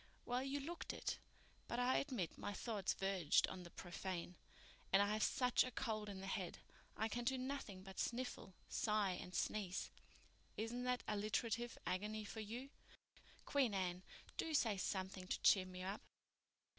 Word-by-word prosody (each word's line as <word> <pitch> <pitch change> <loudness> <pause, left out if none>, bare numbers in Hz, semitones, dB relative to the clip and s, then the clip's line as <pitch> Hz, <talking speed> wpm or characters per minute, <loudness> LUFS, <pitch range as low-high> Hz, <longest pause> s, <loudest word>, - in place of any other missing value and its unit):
"Well, 245 +1 +1
you 275 +2 -1
looked 330 +5 -3
it. - - -2 0.5
But 235 - -1
I 250 +1 +4
admit 245 - -1
my 205 - -3
thoughts 205 -2 0
verged 190 -5 +4
on 185 - -5
the 175 - -8
profane. 175 0 -4 0.6
And 195 - +7
I 205 +1 +4
have 215 - +1
such 250 +3 +4
a 255 - -2
cold 220 -4 -1
in 190 -2 -5
the - - -5
head—I 195 +3 -3
can 240 +2 -2
do 260 +2 +2
nothing 255 -8 -3
but 190 -1 -8
sniffle, 240 -6 -2
sigh 210 -3 +2
and 180 0 -5
sneeze. 195 -3 0 0.7
Isn't 240 +3 -1
that 250 0 +1
alliterative 225 +3 0
agony 210 +3 -1
for 220 - -5
you? 235 +6 -4 0.7
Queen 260 -7 +3
Anne, 180 -1 0 0.4
do 320 -1 +1
say 225 -7 +4
something 190 -1 -2
to - - 0
cheer 185 -2 +7
me 185 0 -6
up." 195 +3 -2
210 Hz, 160 wpm, -42 LUFS, 190-245 Hz, 0.7 s, And